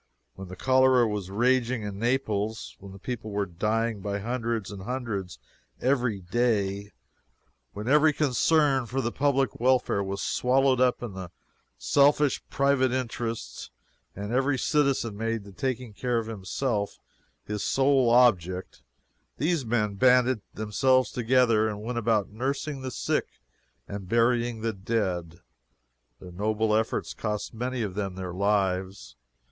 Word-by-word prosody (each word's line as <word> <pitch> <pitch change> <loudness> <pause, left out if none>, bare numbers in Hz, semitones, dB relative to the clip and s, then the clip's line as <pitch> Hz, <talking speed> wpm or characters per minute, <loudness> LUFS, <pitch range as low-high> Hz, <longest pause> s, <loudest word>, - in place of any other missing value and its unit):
When 95 0 -9
the 95 - -8
cholera 130 -1 +4
was 105 -3 -4
raging 120 +2 +1
in 100 -1 -5
Naples; 110 -3 -1
when 100 -1 -11
the 95 - -11
people 110 +1 -5
were 100 -1 -1
dying 110 +4 -1
by 100 +1 -2
hundreds 115 -1 -3
and 100 -2 -8
hundreds 100 - -4 0.4
every 125 -6 0
day; 100 -1 0 0.8
when 105 +2 -6
every 150 +3 +5
concern 145 -2 +2
for 130 +4 -2
the 120 -3 -1
public 135 -4 0
welfare 125 -4 +2
was 100 0 -4
swallowed 130 0 +2
up 125 -1 +2
in 95 -6 -6 0.5
selfish 140 - +3
private 135 -2 +2
interest, 115 - -4 0.5
and 105 +3 -5
every 135 +2 +2
citizen 135 -7 +1
made 115 0 -2
the 100 - -12
taking 125 +2 -3
care 120 +3 -1
of 115 - -1
himself 105 +1 -3 0.5
his 105 -1 -4
sole 135 -2 +3
object, 95 -7 +2 0.6
these 160 -1 0
men 110 -3 0
banded 125 +2 +4
themselves 130 +5 +2
together 120 -2 +3
and 105 -1 -5
went 120 +1 -2
about 110 -3 +1
nursing 135 +5 -3
the 130 - -4
sick - - -1 0.6
and 100 -2 -7
burying 120 0 +1
the 115 0 -1
dead. 95 -5 -2 0.8
Their 90 - -11
noble 105 +3 0
efforts 110 +1 -1
cost 105 0 -4
many 125 +1 -3
of 100 -3 -4
them 95 -2 -3
their 90 -2 -5
lives. 95 -5 -1
115 Hz, 140 wpm, -27 LUFS, 100-130 Hz, 0.8 s, every